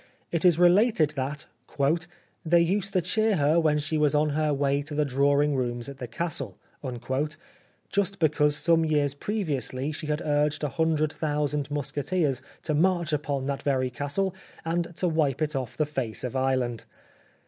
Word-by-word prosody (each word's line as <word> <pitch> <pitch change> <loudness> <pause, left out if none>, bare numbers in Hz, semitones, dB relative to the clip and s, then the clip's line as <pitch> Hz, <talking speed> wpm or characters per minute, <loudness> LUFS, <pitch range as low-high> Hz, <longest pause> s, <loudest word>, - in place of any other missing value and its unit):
It 170 - -1
is 175 -3 +5
related 175 -2 +4
that 145 0 -3 0.5
" 175 +1 -16
they 170 +1 +5
used 195 +3 0
to 185 - +3
cheer 215 +4 +2
her 155 +1 +3
when 155 -2 +3
she 155 +1 -1
was 150 -1 +3
on 150 +1 +3
her 150 +1 +1
way 140 0 +1
to 150 +1 -7
the 150 0 +2
drawing 140 +2 +2
rooms 120 -1 -2
at 140 -1 -9
the 125 - -5
Castle"; 135 - -4 1.3
just 200 0 0
because 150 -2 +2
some 165 +1 +3
years 150 -3 +1
previously 145 - -2
she 155 +1 -6
had 150 +2 -1
urged 150 0 +1
a 150 - +1
hundred 155 +1 +1
thousand 150 -2 -1
musketeers 145 0 -1 0.2
to 155 - 0
march 170 0 +2
upon 140 -2 -1
that 140 0 -2
very 130 -3 0
Castle, 145 +9 -1 0.3
and 170 +1 -1
to 180 - 0
wipe 155 -5 +1
it 150 -1 -1
off 130 -4 -4
the 155 - +2
face 130 -7 -4
of 125 0 -4
Ireland. 130 -3 0
150 Hz, 170 wpm, -27 LUFS, 140-165 Hz, 1.3 s, is